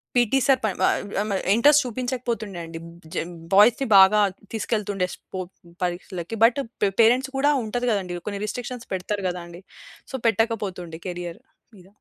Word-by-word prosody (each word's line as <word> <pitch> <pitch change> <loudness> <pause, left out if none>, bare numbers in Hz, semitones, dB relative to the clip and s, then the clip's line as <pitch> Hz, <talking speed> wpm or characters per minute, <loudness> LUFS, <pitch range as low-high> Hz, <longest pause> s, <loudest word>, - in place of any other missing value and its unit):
PET 245 +2 +3
sir 265 -1 +5
పన్ 205 -4 0
వ - - +5 0.4
అమ 210 - -3 0.2
ఇంట్రెస్ట్ 290 +7 +6
చూపించకపోతుండే 240 -5 -3
అండి. 165 0 -8 0.3
జ - - -7 0.4
బాయ్స్‌ని 230 +7 +5
బాగా 195 +2 +7 0.3
తీసుకెళ్తుండే 205 -3 -1
స్పో 190 - -9 0.4
పరీక్షలకి. 180 +2 -4
బట్ 235 +4 +5 0.2
పే 205 - +4
పేరెంట్స్ 250 +4 +4
కూడా 285 +2 +3
ఉంటది 245 +3 -2
గదండి! 185 -4 -2
కొన్ని 200 -1 -3
రిస్ట్రిక్షన్స్ 245 +2 -6
పెడతారు 195 +2 -3
గదా! 180 0 -5
అండి. 175 +1 -11 0.5
సో - - -4
పెట్టకపోతుండే 200 -7 -1
కేరియర్ 175 0 -6 0.4
మీద. 185 -1 -17
210 Hz, 145 wpm, -24 LUFS, 185-245 Hz, 0.5 s, బాగా